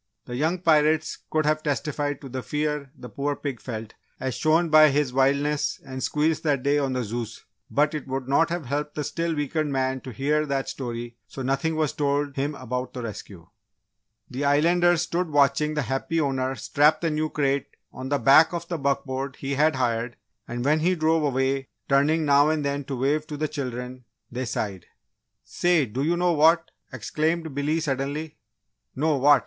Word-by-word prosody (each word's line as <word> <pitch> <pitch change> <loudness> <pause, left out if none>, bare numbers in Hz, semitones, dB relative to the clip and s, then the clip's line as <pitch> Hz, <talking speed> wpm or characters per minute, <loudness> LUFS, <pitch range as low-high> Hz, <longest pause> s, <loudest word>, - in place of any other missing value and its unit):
The 120 - -6
young 160 +7 +1
pirates 155 -2 +3
could 155 -1 +1
have 155 0 +2
testified 145 -1 -2
to 140 - -8
the 130 0 -5
fear 150 0 -2
the 125 - -9
poor 140 +3 -2
pig 140 -5 -5
felt 110 -3 -6 0.3
as 130 -1 -2
shown 160 +5 +2
by 155 0 +8
his 140 -2 0
wildness 140 +3 +1
and 130 0 -6
squeals 155 +3 +1
that 145 -5 0
day 145 +1 +3
on 135 -2 -1
the 125 -1 -1
Zeus, 115 +1 -5 0.2
but 150 +2 +2
it 150 -3 -5
would 130 -1 -3
not 140 +5 +3
have 170 -3 -3
helped 145 +3 -3
the 150 - -2
still 165 +2 -2
weakened 150 +1 -1
man 130 -1 -1
to 130 - -8
hear 150 +6 0
that 135 -1 -1
story 120 -2 -5
so 135 - -7
nothing 140 +5 0
was 155 -3 0
told 145 -1 0
him 145 +2 -1
about 125 0 -4
the 125 - -5
rescue. 100 -6 -8 0.8
The 130 +3 -4
Islanders 170 +4 +3
stood 175 0 -1
watching 145 +1 +2
the 150 - 0
happy 135 +6 -1
owner 135 -3 0
strap 150 +3 +2
the 165 -2 0
new 155 +1 -1
crate 140 -2 0 0.3
on 130 +1 -6
the 145 - +2
back 140 +7 +6
of 170 0 -4
the 170 -2 -2
buckboard 135 -1 -2
he 140 0 -4
had 150 +2 +3
hired, 120 -2 -1 0.3
and 120 +1 -4
when 155 +2 +3
he 180 +4 +2
drove 160 -2 +2
way, 135 +1 0 0.2
turning 150 +3 +3
now 145 +1 +5
and 155 -2 0
then 140 0 -2
to 135 -1 -4
wave 150 +4 0
to 150 - -6
the 155 +1 -1
children, 125 -3 -5 0.3
they 125 +2 -3
sighed. 100 -5 -4 0.6
"Say, 175 -5 +2
do 125 +3 -4
you 165 +4 +1
know 175 0 +2
what?" 160 +2 +4 0.2
exclaimed 155 +7 -2
Billy, 145 +3 0
suddenly. 145 +1 -3 0.6
"No, 150 +2 +1
what?" 145 +1 +6
145 Hz, 190 wpm, -25 LUFS, 130-155 Hz, 0.8 s, by